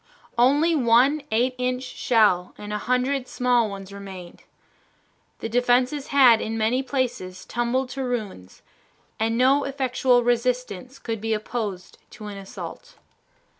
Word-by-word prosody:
Only 285 +8 +4
one 265 +2 +4
eight 245 +4 +2
inch 250 0 -1
shell 215 -8 +1
and 210 0 -7
a 210 - -2
hundred 250 +3 0
small 245 -3 +1
ones 195 0 -8
remained. 190 -3 -10 1.0
The - - -2
defenses 250 +4 +1
had 255 -5 +6
in 225 +1 -3
many 225 +4 +1
places 245 -9 -3
tumbled 240 +2 -1
to 270 +1 -4
ruins, 215 - -5 0.6
and 225 +1 0
no 270 +3 +4
effectual 260 -2 +1
resistance 250 0 -1
could 225 -3 -5
be 225 0 0
opposed 210 -4 -5
to 220 -3 -10
an 205 -1 -7
assault. 195 - -9
245 Hz, 130 wpm, -24 LUFS, 215-255 Hz, 1.0 s, had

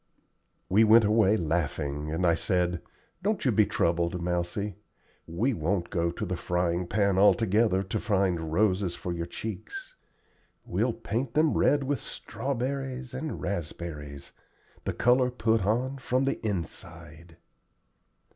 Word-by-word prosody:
We 105 +4 +5
went 110 +1 +7
away 105 0 +4
laughing, 75 -3 -2
and 85 +3 0
I 85 - +5
said: 90 +1 0 0.4
"Don't - - -1
you - - +4
be - - +4
troubled, 85 +1 0
Mousie; 90 +4 -2 0.5
we 110 +11 0
won't 85 0 -1
go 85 -3 +1
to 85 - -4
the 90 - -2
frying 90 0 -1
pan 100 -1 +2
altogether 105 -1 +4
to 95 - -3
find 95 -7 0
roses 95 0 +1
for 90 - -4
your 85 0 -4
cheeks. 110 - -7 0.7
We'll - - 0
paint 120 +2 -3
them 155 0 +4
red 145 -1 +3
with 135 -1 -1
strawberries 130 0 -4
and 145 +4 -4
raspberries, 75 -6 -5 0.5
the - - -1
color 125 +1 +3
put 115 -3 +1
on 130 +5 0
from 130 +1 0
the 135 - -2
inside." 85 -4 -6
95 Hz, 135 wpm, -28 LUFS, 85-115 Hz, 0.7 s, went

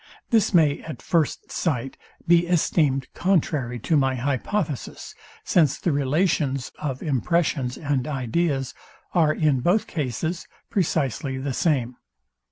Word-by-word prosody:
This 225 -4 +3
may 155 -5 +3
at 155 -7 -8
first 165 -4 -1
sight 135 -6 -2 0.3
be 175 0 +5
esteemed 155 -5 +2
contrary 150 -9 0
to 160 - +1
my 135 -2 +2
hypothesis; 145 - -3 0.3
since 155 -5 +3
the 175 - 0
relations 140 -1 0
of 135 -4 -4
impressions 140 -3 0
and 145 -3 -1
ideas 135 0 -1 0.4
are 160 -4 +4
in 150 -4 +2
both 180 - +2
cases 160 - -3 0.2
precisely 145 - 0
the 135 0 -3
same. 125 -5 0
145 Hz, 120 wpm, -24 LUFS, 130-170 Hz, 0.4 s, be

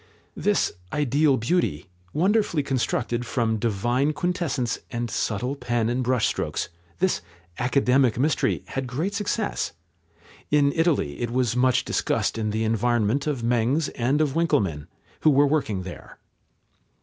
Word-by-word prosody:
This - - +1 0.2
"ideal 145 0 +2
beauty," 115 - 0 0.3
wonderfully 185 -2 +2
constructed 120 -2 -1
from 115 -2 0
divine 120 +7 0
quintessence 150 -7 -1
and 120 -1 -3
subtle 120 +8 -1
pen 120 -3 -1
and 125 +2 0
brush 125 -2 +2
strokes, - - -2 0.3
this 190 +1 +1 0.4
academic 125 -1 +3
mystery, 145 +4 +1
had 135 -1 -3
great 155 +11 -2
success. 205 +1 -2 0.8
In 145 -1 +3
Italy 160 - +1
it 120 - -1
was 120 -1 0
much 125 0 +3
discussed - - 0
in 110 -1 -1
the 110 +1 -1
environment 115 +4 +1
of 135 -6 -1
Mengs 125 +6 +1
and 130 +5 +1
of 145 -3 +1
Winckelmann, 100 - 0 0.3
who - - +4
were 145 0 +5
working 140 -10 0
there. 90 -1 -10
130 Hz, 135 wpm, -25 LUFS, 115-150 Hz, 0.8 s, were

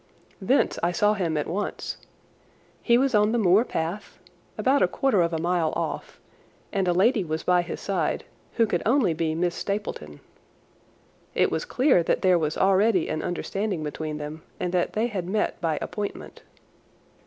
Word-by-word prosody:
Thence 255 +9 +2
I 170 - +1
saw 210 +4 +2
him 170 -6 -1
at 150 - -1
once. 200 +4 -4 0.8
He 235 -1 +4
was 265 0 +1
on 210 +1 +3
the - - +2
moor 200 0 +4
path 170 -1 -4 0.4
about 270 +2 +2
a - - +5
quarter 270 -9 +1
of 170 0 +1
a 165 - -1
mile 170 -1 0
off, - - -4 0.5
and 195 -3 0
a - - +4
lady 205 +5 +3
was 160 -1 -3
by 180 -1 +3
his 175 - -6
side 185 -6 -1 0.3
who 230 - +3
could 220 - -1
only 230 - +3
be 160 0 -1
Miss 175 +1 0
Stapleton. 175 - -4 1.2
It - - +3
was 160 - -2
clear 255 - +3
that 165 - 0
there 185 -2 +4
was 155 -1 -1
already 195 -1 +3
an 155 - -2
understanding 190 0 -3
between 150 0 -4
them 150 +1 -7 0.2
and 180 - -2
that 180 -1 0
they 220 +2 +1
had 195 -7 -3
met 210 -2 -1
by 160 -3 0
appointment. 205 -1 -6
180 Hz, 175 wpm, -25 LUFS, 165-210 Hz, 1.2 s, a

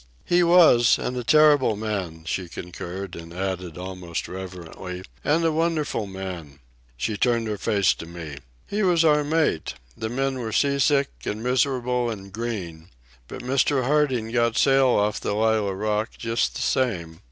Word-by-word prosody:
"He 175 0 +3
was, 170 -9 +6
and 125 - -3
a 125 - -3
terrible 145 -3 +5
man," 100 -7 -4
she 90 +2 -3
concurred, 90 +2 -7
and 85 0 -9
added, 90 -2 -4
almost 90 -2 -5
reverently: 90 0 -7 0.2
"And 165 +3 +2
a 165 - +3
wonderful 155 -8 -1
man." 90 -7 -7 0.4
She 105 - -2
turned 115 0 +1
her 105 -2 -3
face 100 -3 +2
to 80 - -9
me. 80 -4 -8 0.3
"He 205 +1 -2
was 175 -4 +3
our 150 -1 +4
mate. 155 - 0 0.2
The 110 - -4
men 135 +2 -1
were 110 -3 -4
sea 140 +3 +2
sick 140 0 +3 0.2
and 110 +2 -3
miserable 125 -1 +1
and 100 -3 -7
green. 95 -8 -5 0.4
But - - -8
Mr. 130 +1 +1
Harding 130 -6 +1
got 115 -1 +2
the - - 0
sail 135 -1 +4
off 105 -4 +2
the 100 - -2
Lallah 110 -2 +1
Rookh 105 +2 -2
just 115 0 -1
the - - -2
same. 85 -11 -1
110 Hz, 165 wpm, -24 LUFS, 95-135 Hz, 0.4 s, was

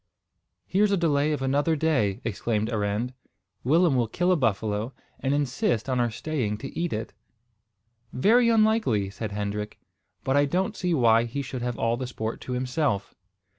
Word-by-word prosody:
"Here's 200 +3 +2
a 200 - +3
delay 150 -3 +2
of 145 -3 -2
another 145 +4 +2
day," 135 -11 +1
exclaimed 110 0 -1
Arend. 105 +3 -1 0.5
"Willem 160 +3 +4
will 120 -2 +2
kill 180 +10 +1
a - - +5
buffalo, 110 - -1 0.3
and 135 - -1
insist 135 -5 0
on 130 -2 0
our 120 -1 +2
staying 115 -3 -2
to 135 +5 -8
eat 170 0 -1
it." 110 +1 -4 1.0
"Very 230 - +4
likely," 215 - +2
said 110 +1 -5
Hendrik; 105 +1 -4 0.5
"but 135 - +1
I 145 0 +5
don't 190 +8 -1
see 180 -3 0
why 115 -3 +4
he 140 +4 -4
should 130 -2 -5
have 120 -1 -2
all 115 +1 +1
the 130 0 -4
sport 110 -2 -4
to 125 - -5
himself." 125 -5 -1
125 Hz, 170 wpm, -26 LUFS, 110-155 Hz, 1.0 s, a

